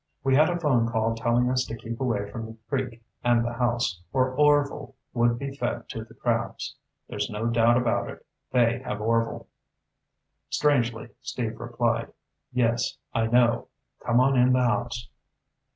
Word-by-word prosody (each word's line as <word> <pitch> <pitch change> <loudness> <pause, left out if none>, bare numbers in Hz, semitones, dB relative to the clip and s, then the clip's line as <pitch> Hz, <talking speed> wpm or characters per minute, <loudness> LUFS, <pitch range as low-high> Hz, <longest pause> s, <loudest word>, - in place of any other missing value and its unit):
We 135 -1 +2
had 155 +4 +5
a 175 0 -1
phone 125 -8 +2
call 115 0 +1
telling 120 +2 +1
us 130 0 +2
to 115 - -6
keep 115 +2 -7
away 110 -6 0
from 115 +1 -5
the 110 0 -11
creek 125 -5 -3 0.2
and 120 -1 +3
the 120 - -2
house, 120 -7 0
or 130 -1 +2
Orvil 145 0 +2 0.2
would 120 -1 +2
be 140 +1 -5
fed - - -3
to - - -5
the - - -17
crabs. - - -2 0.3
There's - - -3
no 105 +2 -3
doubt 115 0 +4
about 120 -1 0
it. - - -10 0.3
They 120 -1 +3
have 105 - -4
Orvil." 115 +1 0 1.0
Strangely, 120 -6 +1
Steve 115 -3 -4
replied, 120 0 -1 0.4
"Yes, 120 -1 +1 0.2
I 115 -1 +1
know. 120 0 +3 0.4
Come 120 +1 +3
on 135 +1 +4
in 125 0 +5
the 130 0 +3
house." 120 +1 -1
120 Hz, 165 wpm, -26 LUFS, 115-125 Hz, 1.0 s, had